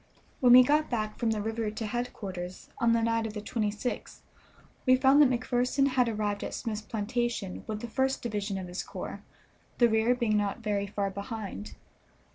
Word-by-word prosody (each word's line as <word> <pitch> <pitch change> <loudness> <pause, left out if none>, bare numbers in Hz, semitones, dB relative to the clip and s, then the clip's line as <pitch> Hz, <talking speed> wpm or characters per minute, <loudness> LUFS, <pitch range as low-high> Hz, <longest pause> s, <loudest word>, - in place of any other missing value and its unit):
When 245 -2 +6
we 255 0 +10
got 300 +4 +2
back 215 -3 -2
from 235 - +1
the 215 -2 -1
river 225 0 -2
to 220 +2 -5
headquarters, 195 -6 -5
on 235 -1 +4
the 230 -1 +2
night 230 0 +1
of 215 - -8
the - - -3
26th, 210 +2 -3 0.7
we 255 - +7
found 265 +3 +5
that 285 - +7
McPherson 250 +2 +1
had 255 -2 +2
arrived 210 -2 -2
at - - -4
Smith's 220 -3 -3
plantation 225 -2 -2
with 215 -1 -4
the 235 - -4
first 265 +3 0
division 205 -3 -2
of 185 -1 -5
his 180 +1 -4
corps, - - -7 0.6
the 240 - +6
rear 225 +2 +3
being 235 -4 +1
not 205 +2 -1
very 200 -2 0
far 200 0 -2
behind. 200 - -6
225 Hz, 185 wpm, -29 LUFS, 205-245 Hz, 0.7 s, we